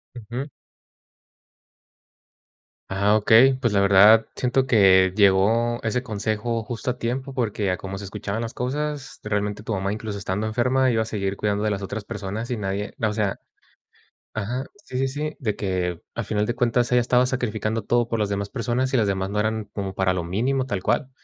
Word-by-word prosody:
Ujú. 120 +4 -5 2.4
Ajá, 100 +2 +3
okey. 120 +5 +6
Pues, 120 -5 0
la 100 - +3
verdad, 100 +3 +7
siento 130 +1 +1
que 95 -6 +5
llegó 110 +4 +3
ese 115 +3 -1
consejo 110 +1 -2
justo 120 +2 -3
a 125 - -7
tiempo, 130 +3 -3
porque 110 -5 -1
a 90 - +1
como 95 +1 -6
se 100 - -7
escuchaban 100 +2 -4
las 115 0 -4
cosas, 145 +2 -3
realmente, 105 0 -2
tu 110 - -4
mamá, 95 0 -1
incluso, 105 -1 -4
estando 100 +2 -2
enferma, 125 +4 +2
iba 115 -2 +2
a 110 - -1
seguir 100 -3 -2
cuidando 105 +1 -1
de - - +2
las 100 -1 -2
otras 100 +1 -5
personas, 105 +4 -5
y 125 - -1
nadie 100 0 -3
n 110 - 0
o 105 - -1
sea 105 -2 -1 0.9
ajá, 120 +5 -3 0.2
sí, 125 - -7
sí, 135 +1 +1
sí. 150 +3 -4
De 110 -6 -1
que 90 -3 -2
al 115 - -3
final 105 0 0
de 120 - -1
cuentas 120 0 +1
ella 125 - +5
estaba 125 +1 +3
sacrificando 115 -3 -2
todo 120 -1 +1
por 115 -1 -1
las 105 - +1
demás 100 0 -2
personas, 125 +3 -1
y - - +5
las 110 -4 +2
demás 95 -1 -1
no 105 +1 -1
eran 110 0 -1
como 100 -2 -3
para 95 -1 +1
lo 90 - -1
mínimo, 120 +10 0
tal 100 -7 -2
cual. 135 - 0
110 Hz, 195 wpm, -24 LUFS, 100-120 Hz, 2.4 s, verdad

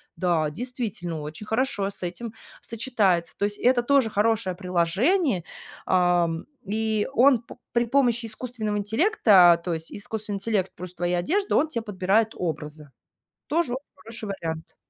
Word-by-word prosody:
"Да, 165 -3 +1
действительно, 205 - -4
очень 155 +7 -7
хорошо 220 -4 0
с 200 - -8
этим 210 +6 -5 0.3
сочетается." 215 -7 0
То 200 - +1
есть, 205 0 -3
это 245 -1 +3
тоже 270 -2 +3
хорошее 210 -3 +1
приложение, 185 - +1 0.4
ам, 180 -1 +3 0.4
и 215 +1 0
он 260 -1 +5
п 235 - -13 0.2
при 235 0 +2
помощи 240 -2 +2
искусственного 220 -2 -4
интеллекта, 205 - +5
то 175 - -1
есть, 160 0 -5
искусственный 210 0 -5
интеллект, 195 -2 -1
плюс 180 0 -6
твоя 175 0 -1
одежда, 390 - 0
он 305 - +3
те 235 -7 -3
подбирает 210 +1 +1
образы. 150 -3 -5 0.6
Тоже 310 -4 0 0.2
хороший 225 -2 -8
вариант. 165 -4 -5
210 Hz, 140 wpm, -25 LUFS, 180-235 Hz, 0.6 s, он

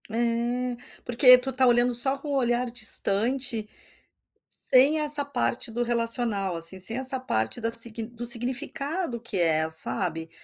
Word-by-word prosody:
É, 240 +2 -3 0.3
porque 250 +1 +6
tu 260 +2 -5
está 260 0 0
olhando 240 0 +2
só 265 +3 +1
com 290 +2 -10
o 285 - -2
olhar 245 -1 -1
distante 230 +1 -1 1.1
sem 275 +5 +5
essa 295 -1 +4
parte 120 - -3
do 240 +2 -3
relacional, 230 -5 0
assim, 165 +3 0
sem 225 +6 +3
essa 260 0 +2
parte 110 - -3
da 230 -1 -3
sig 230 -1 +1
do 235 +1 -9
significado 260 +4 0
que 225 -3 -6
é, 160 -2 0
sabe? 160 0 -5
240 Hz, 150 wpm, -24 LUFS, 220-255 Hz, 1.1 s, porque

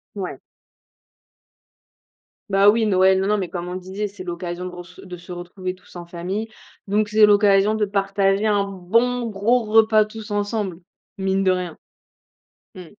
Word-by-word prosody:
Ouais. 195 -3 -5 2.1
Bah 195 +1 +5
oui, 220 +1 +3
Noël, 190 -1 +4
non, 190 - 0
non, 210 +1 +2
mais 185 - -3
comme 175 -1 -5
on 180 - -5
le 185 - -4
disait, 190 +3 -4
c'est 200 -2 -10
l'occasion 175 0 -5
gross 180 0 -11
de 180 -2 -9
se 175 +1 -13
retrouver 180 +1 -6
tous 185 - -20
en 175 -1 -7
famille. 180 +6 -4 0.4
Donc 210 +1 +1
c'est 215 0 +6
l'occasion 205 0 +4
de 220 -1 +1
partager 195 0 0
un 205 -2 +2
bon 230 +6 0
gros 225 +5 +1
repas 220 0 +4
tous 215 0 -10
ensemble, 205 -3 -2 0.4
mine 195 0 0
de 190 - +3
rien. 180 -3 -3 1.0
Mmh. 185 -2 -10
195 Hz, 160 wpm, -22 LUFS, 185-210 Hz, 2.1 s, c'est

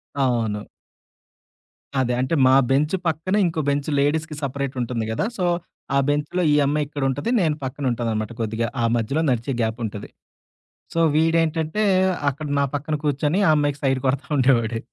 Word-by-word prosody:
అవును. 115 -6 0 1.3
అదే. 125 -1 +1
అంటే, 130 +6 0
మా 130 - +5 0.2
బెంచు 150 +7 +2
పక్కనే 165 +6 0
ఇంకో 165 -2 -1
బెంచు. 140 +1 -1
లేడీస్‌కి 155 +2 0
సెపరేటుంటుంది 130 -4 -2
గదా! 115 - -1
సో, 180 - 0 0.5
ఆ - - +4
బెంచ్‌లో 150 +5 0
ఈ - - +4
అమ్మాయి 145 +1 +1
ఇక్కడుంటది, 145 - -2
నేను 155 -3 +1
పక్కనుంటాననమాట 120 -5 -2
కొద్దిగా. 115 +1 -1 0.2
ఆ - - +3
మధ్యలో 130 +8 0
నడిచే 120 +3 -1
గ్యాపుంటది. 110 -2 -3 0.9
సో, 165 - -1 0.2
వీడేంటంటే, 165 +4 +1 0.5
అక్కడ 150 +3 -7
నా - - +3
పక్కన 150 +2 -3
కూర్చొని 145 +6 +1
ఆ - - +6
అమ్మాయికి 145 -1 0
సైటు 135 -1 +2
కొడతా 140 +2 0
ఉండేవోడు. 120 -3 +2
140 Hz, 140 wpm, -22 LUFS, 120-155 Hz, 1.3 s, ఆ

